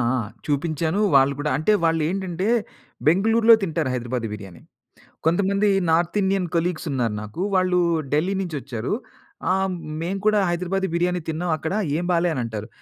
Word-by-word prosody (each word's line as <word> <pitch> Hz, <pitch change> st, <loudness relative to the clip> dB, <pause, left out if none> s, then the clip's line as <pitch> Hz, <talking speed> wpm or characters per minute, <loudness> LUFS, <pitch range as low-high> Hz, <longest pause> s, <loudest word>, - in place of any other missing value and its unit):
ఆ! -, -, 0 dB, 0.3 s
చూపించాను 155 Hz, +4 st, -1 dB, 0.2 s
వాళ్ళు 135 Hz, +1 st, +5 dB
కూడా 150 Hz, -1 st, -1 dB
అంటే 185 Hz, +8 st, +2 dB
వాళ్ళేంటంటే 175 Hz, +3 st, 0 dB, 0.6 s
'బెంగుళూరులో' 225 Hz, +7 st, +5 dB
తింటారు 160 Hz, -6 st, -1 dB
హైదరాబాద్ 120 Hz, -1 st, -3 dB
బిర్యానీ. 95 Hz, -5 st, -10 dB, 0.7 s
కొంతమంది 200 Hz, +4 st, +2 dB, 0.2 s
నార్త్ 170 Hz, +5 st, +2 dB
ఇండియన్ 190 Hz, -1 st, +1 dB
కొలీగ్స్ 170 Hz, +1 st, -1 dB
ఉన్నారు 120 Hz, -5 st, 0 dB
నాకు 105 Hz, +10 st, -8 dB
వాళ్ళు 185 Hz, -1 st, +3 dB, 0.3 s
'ఢిల్లీ' 175 Hz, +7 st, +1 dB
నుంచోచ్చారు, 135 Hz, -, -4 dB, 0.6 s
"ఆ! -, -, +4 dB, 0.5 s
మేము 185 Hz, +4 st, -2 dB
కూడా 215 Hz, -1 st, +4 dB
హైదరాబాదీ 180 Hz, +2 st, -1 dB
బిర్యానీ 180 Hz, +1 st, +1 dB
తిన్నాం 170 Hz, +2 st, -2 dB
అక్కడ 160 Hz, +2 st, -4 dB, 0.2 s
ఏం 175 Hz, -, -2 dB
బాలే" 175 Hz, 0 st, +2 dB
అని 125 Hz, -, -2 dB
అంటారు. 110 Hz, -1 st, -5 dB
170 Hz, 140 wpm, -23 LUFS, 140-185 Hz, 0.7 s, వాళ్ళు